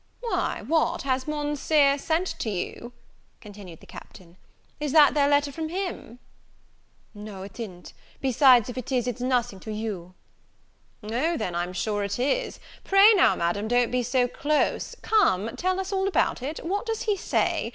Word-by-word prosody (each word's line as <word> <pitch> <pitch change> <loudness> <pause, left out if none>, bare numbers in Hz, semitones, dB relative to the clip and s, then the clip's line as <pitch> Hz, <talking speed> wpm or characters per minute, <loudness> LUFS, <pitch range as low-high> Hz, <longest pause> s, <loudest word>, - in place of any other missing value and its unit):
"Why, 470 - -2
what, 320 +5 +1
has 260 -1 -1
Monseer 295 -1 +1
sent 325 +5 0
to 225 - -2
you?" 210 +5 -5 0.5
continued 200 -6 -12
the - - -15
Captain: 170 -2 -13 0.4
"is 295 -2 -3
that 305 -2 +7
there 285 -1 +3
letter 285 0 +2
from 315 +2 -5
him?" 360 - -5 1.0
"No, 205 -2 -9
it 200 +4 -11
i'n't; 185 -6 -8 0.3
besides, 255 -3 +5
if 250 0 -5
it 255 - -8
is, 250 -2 +1
it's 245 -1 -4
nothing 245 -5 0
to 215 - -8
you." 205 -5 -5 0.9
"O 260 +11 -1
then, 180 - -3
I'm 175 +1 -2
sure 205 +3 -2
it 200 0 -3
is! 285 - -1 0.2
Pray 395 +3 +6
now, 390 - +4
Madam, 175 +5 -1
don't 245 +1 +2
be 250 0 +1
so 245 +1 +1
close; 300 +4 -1
come 230 - +2
tell 370 +1 -1
us 385 +1 -4
all 385 0 0
about 365 -8 0
it 295 +5 -5
what 405 +6 -2
does 450 -1 -2
he 420 -2 +1
say? 380 - -1
255 Hz, 170 wpm, -25 LUFS, 210-315 Hz, 1.0 s, that